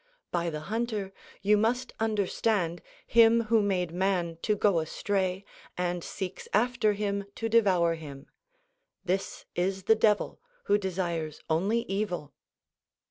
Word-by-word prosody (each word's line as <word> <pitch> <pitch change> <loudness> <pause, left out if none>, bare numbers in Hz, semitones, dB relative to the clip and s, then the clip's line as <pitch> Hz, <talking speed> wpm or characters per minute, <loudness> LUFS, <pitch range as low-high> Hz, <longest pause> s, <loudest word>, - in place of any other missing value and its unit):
By 170 -1 0
the 155 -2 -5
hunter 215 0 -3 0.3
you 210 +1 +5
must 240 +4 0
understand 205 -4 0 0.2
him 230 0 +6
who 225 - +6
made 185 -4 0
man 175 -2 0
to 210 - +1
go 200 -4 +3
astray 190 +3 -1 0.3
and 175 -1 -1
seeks 190 -2 -6
after 235 -1 +2
him 200 -1 -2
to 225 - -2
devour 190 -7 +4
him. 145 -3 -9 0.8
This 190 +1 -2
is 190 +2 -1
the 220 - +5
Devil, 215 -1 +1 0.2
who 205 +1 +3
desires 170 -5 -3
only 200 +9 +2
evil. 195 - -3
195 Hz, 130 wpm, -29 LUFS, 175-215 Hz, 0.8 s, him